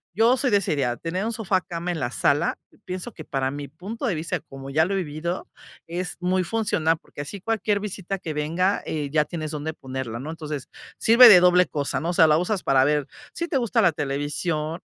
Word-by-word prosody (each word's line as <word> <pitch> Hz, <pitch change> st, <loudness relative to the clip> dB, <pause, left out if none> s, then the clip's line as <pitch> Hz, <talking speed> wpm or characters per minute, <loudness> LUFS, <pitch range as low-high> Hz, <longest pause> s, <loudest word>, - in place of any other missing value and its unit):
Yo 230 Hz, +5 st, +4 dB
soy 260 Hz, -, +1 dB
de 205 Hz, -, +4 dB
esa 195 Hz, -5 st, -1 dB
idea, 125 Hz, -4 st, 0 dB
tener 170 Hz, -, -3 dB
un 230 Hz, -, -1 dB
sofá 205 Hz, -4 st, 0 dB
cama 170 Hz, 0 st, -4 dB
en 170 Hz, -, -3 dB
la 120 Hz, -, -1 dB
sala, 145 Hz, +5 st, +1 dB, 0.3 s
pienso 185 Hz, +5 st, -5 dB
que 155 Hz, -, -9 dB
para 135 Hz, -1 st, -1 dB
mi 145 Hz, 0 st, -6 dB
punto 195 Hz, -, -7 dB
de 200 Hz, -, 0 dB
vista, 165 Hz, +3 st, -2 dB
como 135 Hz, -1 st, -10 dB
ya 160 Hz, +3 st, +3 dB
lo 195 Hz, -, -2 dB
he -, -, +1 dB
vivido, 170 Hz, +1 st, -4 dB, 0.4 s
es 180 Hz, +2 st, -4 dB
muy 185 Hz, +1 st, +1 dB
funcional, 170 Hz, -6 st, 0 dB
porque, 145 Hz, -, -10 dB
así 180 Hz, +7 st, -7 dB
cualquier 215 Hz, -1 st, 0 dB
visita 195 Hz, -1 st, -4 dB
que 165 Hz, -4 st, -5 dB
venga, 165 Hz, +6 st, 0 dB
eh, 150 Hz, -2 st, -3 dB
ya 150 Hz, 0 st, +3 dB
tienes 155 Hz, -3 st, -5 dB
dónde 155 Hz, +1 st, -4 dB
ponerla, 130 Hz, -5 st, -6 dB
¿no? 150 Hz, +5 st, -5 dB
Entonces, 150 Hz, -4 st, -6 dB, 0.3 s
sirve 235 Hz, +2 st, +8 dB
de 190 Hz, -5 st, +10 dB
doble 180 Hz, 0 st, +5 dB
cosa, 145 Hz, -1 st, -2 dB
¿no?, 165 Hz, -, -3 dB
o -, -, 0 dB
sea, 165 Hz, -2 st, +6 dB
la 150 Hz, 0 st, +4 dB
usas 185 Hz, +2 st, -1 dB
para 135 Hz, -1 st, +4 dB
ver, 150 Hz, 0 st, +1 dB, 0.3 s
sí 340 Hz, -, -3 dB
te 320 Hz, -, 0 dB
gusta 235 Hz, -2 st, +1 dB
la 175 Hz, -5 st, +5 dB
televisión 150 Hz, +3 st, -2 dB
170 Hz, 225 wpm, -24 LUFS, 150-190 Hz, 0.4 s, de